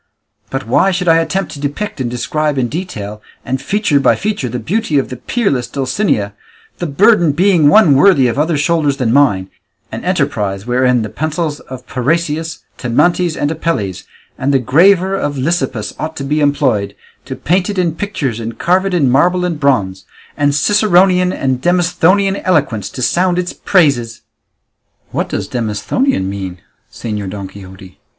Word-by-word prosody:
But 135 Hz, 0 st, -4 dB
why 125 Hz, -, +3 dB
should 180 Hz, -1 st, -2 dB
I 165 Hz, 0 st, +5 dB
attempt 165 Hz, +1 st, -1 dB
to 145 Hz, -, -8 dB
depict 145 Hz, +3 st, -4 dB
and 120 Hz, -, -2 dB
describe 145 Hz, +5 st, -2 dB
in 125 Hz, -2 st, 0 dB
detail, 110 Hz, -, -6 dB, 0.2 s
and 130 Hz, +1 st, -2 dB
feature 200 Hz, -2 st, +1 dB
by -, -, +3 dB
feature, 205 Hz, -, -2 dB
the 125 Hz, -, -4 dB
beauty 180 Hz, -, -1 dB
of 135 Hz, -, 0 dB
the 125 Hz, -, -6 dB
peerless 140 Hz, -, -1 dB
Dulcinea, 130 Hz, -, -1 dB, 0.5 s
the 175 Hz, -, -2 dB
burden 175 Hz, 0 st, +3 dB
being 175 Hz, -3 st, +4 dB
one 185 Hz, -3 st, +6 dB
worthy 140 Hz, -1 st, +5 dB
of 120 Hz, +4 st, -2 dB
other 155 Hz, +1 st, +1 dB
shoulders 150 Hz, -2 st, +1 dB
than 120 Hz, -3 st, 0 dB
mine, 100 Hz, -10 st, +2 dB, 0.4 s
an -, -, -6 dB
enterprise 100 Hz, -1 st, -1 dB
wherein 125 Hz, -1 st, +2 dB
the 110 Hz, -, -5 dB
pencils 155 Hz, +1 st, -3 dB
of 130 Hz, -1 st, -10 dB
Parrhasius, 160 Hz, +5 st, -2 dB, 0.2 s
Timantes, 170 Hz, +7 st, +1 dB
and 145 Hz, -, -1 dB
Apelles, 130 Hz, -, -2 dB, 0.4 s
and 135 Hz, +2 st, 0 dB
the 135 Hz, -, +4 dB
graver 180 Hz, -, +3 dB
of 145 Hz, -7 st, -2 dB
Lysippus 130 Hz, -7 st, -2 dB
ought 160 Hz, +1 st, -4 dB
to 140 Hz, -, -4 dB
be 150 Hz, +3 st, -1 dB
employed, 130 Hz, -9 st, +1 dB, 0.3 s
to -, -, -6 dB
paint 180 Hz, +4 st, 0 dB
it 200 Hz, -, -4 dB
in 175 Hz, -3 st, +1 dB
pictures 155 Hz, -, -3 dB
and 115 Hz, 0 st, -6 dB
carve 185 Hz, +2 st, +1 dB
it 190 Hz, -, -1 dB
in 150 Hz, -6 st, +2 dB
marble 180 Hz, +8 st, +2 dB
and 170 Hz, -4 st, -3 dB
bronze, 100 Hz, -10 st, 0 dB, 0.3 s
and 145 Hz, -1 st, +1 dB
Ciceronian 185 Hz, 0 st, +3 dB
and 130 Hz, -6 st, -2 dB
Demosthenian 180 Hz, +3 st, +2 dB
eloquence 140 Hz, -, 0 dB
to 130 Hz, -, -6 dB
sound 180 Hz, +5 st, +1 dB
its 180 Hz, 0 st, -2 dB
praises?" 140 Hz, -, +1 dB, 0.9 s
"What -, -, -2 dB
does -, -, -3 dB
Demosthenian 110 Hz, -, -1 dB
mean, 95 Hz, -2 st, -5 dB, 0.3 s
Señor 105 Hz, -4 st, -5 dB
Don 100 Hz, 0 st, -6 dB
Quixote?" 95 Hz, -1 st, -13 dB
145 Hz, 165 wpm, -15 LUFS, 120-180 Hz, 0.9 s, one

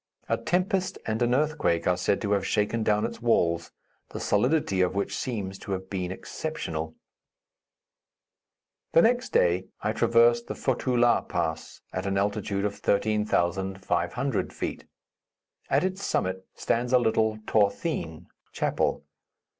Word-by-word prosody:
A -, -, +2 dB
tempest 185 Hz, +1 st, 0 dB
and 110 Hz, +1 st, -2 dB
an 120 Hz, +1 st, +3 dB
earthquake 150 Hz, -, +1 dB
are 90 Hz, -, +4 dB
said 90 Hz, +2 st, 0 dB
to 105 Hz, -, -1 dB
have 100 Hz, -2 st, +2 dB
shaken 105 Hz, +2 st, 0 dB
down 105 Hz, -1 st, +2 dB
its -, -, -6 dB
walls, 85 Hz, -8 st, +2 dB, 0.4 s
the -, -, -6 dB
solidity 105 Hz, -3 st, +2 dB
of 90 Hz, +1 st, +1 dB
which 100 Hz, -, -1 dB
seems 100 Hz, -6 st, -4 dB
to 100 Hz, -, -4 dB
have 95 Hz, 0 st, -5 dB
been 90 Hz, -2 st, -2 dB
exceptional. 80 Hz, -, -5 dB, 2.0 s
The 165 Hz, -, +7 dB
next 245 Hz, +2 st, +2 dB
day 90 Hz, +2 st, +2 dB
I 105 Hz, -, -1 dB
traversed 120 Hz, +1 st, +4 dB
the -, -, -4 dB
Fotu 130 Hz, -1 st, 0 dB
La 120 Hz, 0 st, +4 dB
Pass, 80 Hz, -2 st, -3 dB
at 95 Hz, +1 st, -2 dB
an 95 Hz, 0 st, 0 dB
altitude 100 Hz, 0 st, 0 dB
of 100 Hz, -, -3 dB
13,500 95 Hz, +2 st, 0 dB
feet. -, -, -5 dB, 0.8 s
At -, -, +3 dB
its 185 Hz, +1 st, -2 dB
summit 95 Hz, 0 st, -1 dB
stands 120 Hz, +2 st, 0 dB
a -, -, +8 dB
little 110 Hz, -2 st, +2 dB
t'horthene 100 Hz, -, 0 dB, 0.3 s
(chapel). -, -, 0 dB
105 Hz, 140 wpm, -27 LUFS, 95-120 Hz, 2.0 s, a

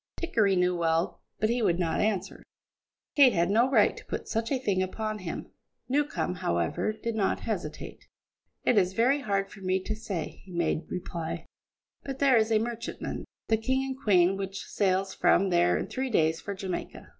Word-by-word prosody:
Dickory 220 Hz, -, +2 dB
knew 180 Hz, 0 st, +2 dB
well, 165 Hz, 0 st, 0 dB, 0.2 s
but 215 Hz, +1 st, +2 dB
he 240 Hz, 0 st, 0 dB
would 170 Hz, -6 st, +2 dB
not 170 Hz, -3 st, 0 dB
answer; 205 Hz, -4 st, -1 dB, 0.7 s
Kate 275 Hz, -4 st, +7 dB
had 170 Hz, +3 st, +2 dB
no 235 Hz, +5 st, +4 dB
right 275 Hz, -, +4 dB
to -, -, -12 dB
put -, -, -5 dB
such 225 Hz, +2 st, -2 dB
a 275 Hz, -, +2 dB
thing 200 Hz, -7 st, 0 dB
upon 215 Hz, +3 st, -3 dB
him. 180 Hz, -4 st, -6 dB, 0.4 s
Newcombe, 290 Hz, -7 st, 0 dB
however, 85 Hz, -, 0 dB
did 230 Hz, +2 st, -4 dB
not 210 Hz, -3 st, 0 dB
hesitate. -, -, -5 dB, 0.6 s
"It 225 Hz, -, +4 dB
is 185 Hz, -1 st, +1 dB
very 250 Hz, +7 st, +3 dB
hard 195 Hz, -4 st, -1 dB
for 195 Hz, -, -12 dB
me 185 Hz, 0 st, +1 dB
to 215 Hz, -, -3 dB
say," 200 Hz, -6 st, -5 dB
he 185 Hz, -, -12 dB
made 170 Hz, -1 st, -1 dB
reply, 170 Hz, -2 st, -4 dB, 0.6 s
"but 270 Hz, -1 st, -5 dB
there 275 Hz, -2 st, +4 dB
is 220 Hz, 0 st, +2 dB
a 220 Hz, -, +5 dB
merchantman, 235 Hz, +1 st, -4 dB, 0.2 s
the 220 Hz, -, +3 dB
King 260 Hz, +4 st, 0 dB
and 265 Hz, -1 st, -3 dB
Queen, 190 Hz, -2 st, +4 dB
which 195 Hz, 0 st, -5 dB
sails 190 Hz, -1 st, 0 dB
from 195 Hz, 0 st, +3 dB
here 175 Hz, 0 st, +4 dB
in -, -, -2 dB
three 260 Hz, 0 st, -3 dB
days 160 Hz, -7 st, +2 dB
for 200 Hz, -, -5 dB
Jamaica. 190 Hz, -1 st, -5 dB
200 Hz, 185 wpm, -28 LUFS, 180-230 Hz, 0.7 s, Kate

